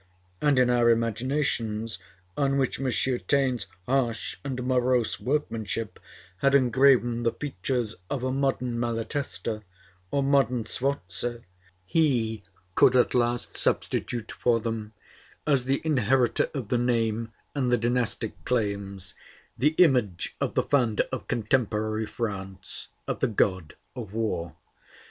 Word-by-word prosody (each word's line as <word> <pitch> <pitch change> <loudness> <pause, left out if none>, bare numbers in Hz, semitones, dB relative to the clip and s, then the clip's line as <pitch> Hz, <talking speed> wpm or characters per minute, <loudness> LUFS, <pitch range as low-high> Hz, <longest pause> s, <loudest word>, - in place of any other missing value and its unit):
And 145 -2 +3
in 125 -1 +5
our 120 -1 +4
imaginations, 115 -1 0 0.4
on 140 -1 +1
which 135 -2 0
M. 135 - 0 0.4
Taine's 130 -5 +1 0.2
harsh 125 -3 0
and 130 -3 -3
morose 125 -2 +1
workmanship 115 -7 -2 0.4
had 140 +4 +3
engraven 125 -2 +4
the 115 -1 +2
features 125 -4 -3
of 135 -3 -2
a 130 - 0
modern 130 -3 0
Malatesta 115 -1 -2 0.5
or 140 +5 +1
modern 135 -4 +2
Sforza, 120 -2 -2 0.4
he 115 - +1 0.3
could 130 - +5
at 125 - +4
last 120 -1 +1
substitute 120 -2 0
for 120 -1 +1
them, 110 -1 -4 0.5
as 140 -4 +3
the 135 +1 0
inheritor 130 -4 +2
of 125 -7 -4
the 120 - +2
name 115 -2 0 0.2
and 130 -4 0
the 120 - +4
dynastic 120 -1 -1
claims, 100 -5 -2 0.4
the 150 +5 +2
image 125 - +3
of - - -1
the - - +3
founder 120 -7 +2
of - - -4
contemporary 110 -1 0
France, 95 -4 -5 0.2
of - - -2
the - - +2
god 95 -6 0 0.2
of 110 -6 -7
war. 110 -7 -2
120 Hz, 125 wpm, -27 LUFS, 110-130 Hz, 0.5 s, in